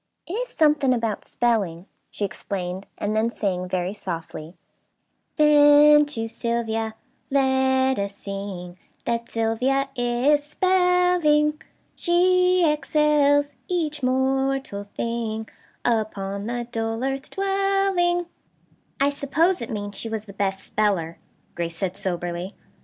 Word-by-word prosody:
"It 345 Hz, -, -7 dB
is -, -, -2 dB
something 295 Hz, -, +3 dB
about 225 Hz, -3 st, -2 dB
'spelling,'" 200 Hz, -8 st, 0 dB, 0.2 s
she 205 Hz, -, -3 dB
explained, 185 Hz, 0 st, -5 dB
and 210 Hz, +1 st, -2 dB
then 220 Hz, +1 st, +2 dB
sang, 185 Hz, -5 st, -2 dB
very 185 Hz, +1 st, -1 dB
softly: 165 Hz, -3 st, -6 dB, 0.8 s
"'Then 295 Hz, 0 st, +6 dB
to 225 Hz, -6 st, -3 dB
Sylvia 225 Hz, -1 st, -2 dB, 0.3 s
let 265 Hz, -1 st, +2 dB
us 200 Hz, 0 st, -3 dB
sing, 195 Hz, -3 st, -7 dB, 0.3 s
That 235 Hz, 0 st, -2 dB
Sylvia 250 Hz, +5 st, 0 dB
is 245 Hz, +4 st, +2 dB
spelling. 360 Hz, -3 st, +2 dB, 0.3 s
She 365 Hz, 0 st, +3 dB
excels 295 Hz, -1 st, +2 dB
each 310 Hz, -5 st, -2 dB
mortal 265 Hz, -4 st, 0 dB
thing, 220 Hz, +1 st, -3 dB, 0.4 s
Upon 205 Hz, -3 st, -1 dB
the 240 Hz, 0 st, -3 dB
dull 225 Hz, +1 st, -2 dB
earth 270 Hz, +1 st, -3 dB
dwelling.' 390 Hz, -3 st, +1 dB, 0.7 s
"I 280 Hz, +1 st, +3 dB
suppose 310 Hz, +5 st, +1 dB
it 235 Hz, -, -5 dB
means 205 Hz, -2 st, -5 dB
she 225 Hz, -, -3 dB
was 220 Hz, -1 st, -4 dB
the 200 Hz, -, -11 dB
best 195 Hz, -1 st, -1 dB
speller," 185 Hz, -6 st, -1 dB, 0.3 s
Grace 170 Hz, -1 st, -4 dB
said 190 Hz, -1 st, -2 dB
soberly. 175 Hz, -1 st, -4 dB
240 Hz, 115 wpm, -24 LUFS, 205-300 Hz, 0.8 s, Then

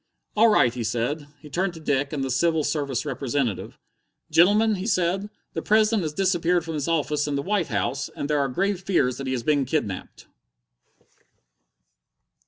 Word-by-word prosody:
"All 220 Hz, +2 st, +6 dB
right," 125 Hz, -, +4 dB
he 125 Hz, -2 st, -4 dB
said. 125 Hz, +7 st, -2 dB
He 150 Hz, -, -12 dB
turned 180 Hz, +2 st, -1 dB
to -, -, -9 dB
Dick 145 Hz, -2 st, 0 dB
and 145 Hz, -3 st, -2 dB
the 135 Hz, -, -2 dB
Civil 160 Hz, +4 st, +2 dB
Service 140 Hz, -5 st, -1 dB
representative. 130 Hz, -6 st, -2 dB, 0.5 s
"Gentlemen," 210 Hz, +6 st, +5 dB
he 185 Hz, +3 st, -4 dB
said, 190 Hz, 0 st, 0 dB, 0.2 s
"the -, -, -3 dB
President 215 Hz, 0 st, +3 dB
has 155 Hz, -3 st, -2 dB
disappeared 175 Hz, -1 st, +1 dB
from 165 Hz, -, -4 dB
his 150 Hz, -1 st, -2 dB
office 150 Hz, -2 st, 0 dB
in 145 Hz, -, -1 dB
the 140 Hz, -, -1 dB
White 195 Hz, -1 st, 0 dB
House, 110 Hz, +6 st, -2 dB
and 145 Hz, -, -3 dB
there 150 Hz, -1 st, +1 dB
are 140 Hz, -1 st, +1 dB
grave 190 Hz, +7 st, -1 dB
fears 135 Hz, -10 st, +1 dB
that 135 Hz, -, -5 dB
he 130 Hz, -, -1 dB
has 120 Hz, -2 st, -2 dB
been 145 Hz, 0 st, +2 dB
kidnapped!" 125 Hz, -9 st, -3 dB
150 Hz, 180 wpm, -24 LUFS, 135-185 Hz, 0.5 s, All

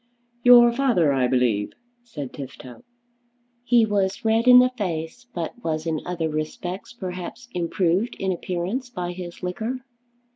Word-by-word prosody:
"Your 240 Hz, -1 st, +8 dB
father, 235 Hz, -, +2 dB
I 130 Hz, -2 st, +2 dB
believe?" 125 Hz, -5 st, +1 dB, 0.3 s
said 150 Hz, -, -8 dB
Tifto. 130 Hz, -, -10 dB, 0.8 s
He 240 Hz, -2 st, +4 dB
was 205 Hz, +2 st, -1 dB
red 225 Hz, +2 st, +2 dB
in 250 Hz, 0 st, +10 dB
the 250 Hz, 0 st, +6 dB
face 180 Hz, +2 st, -4 dB
but 180 Hz, +7 st, -6 dB
was 155 Hz, -1 st, -2 dB
in 160 Hz, -2 st, -1 dB
other 175 Hz, -2 st, -1 dB
respects 155 Hz, +4 st, -4 dB
perhaps 185 Hz, +2 st, -7 dB
improved 180 Hz, +4 st, 0 dB
in 190 Hz, -1 st, -2 dB
appearance 185 Hz, +8 st, -3 dB
by 180 Hz, -6 st, -4 dB
his 175 Hz, 0 st, -8 dB
liquor. 225 Hz, +8 st, -4 dB
180 Hz, 140 wpm, -24 LUFS, 160-240 Hz, 0.8 s, in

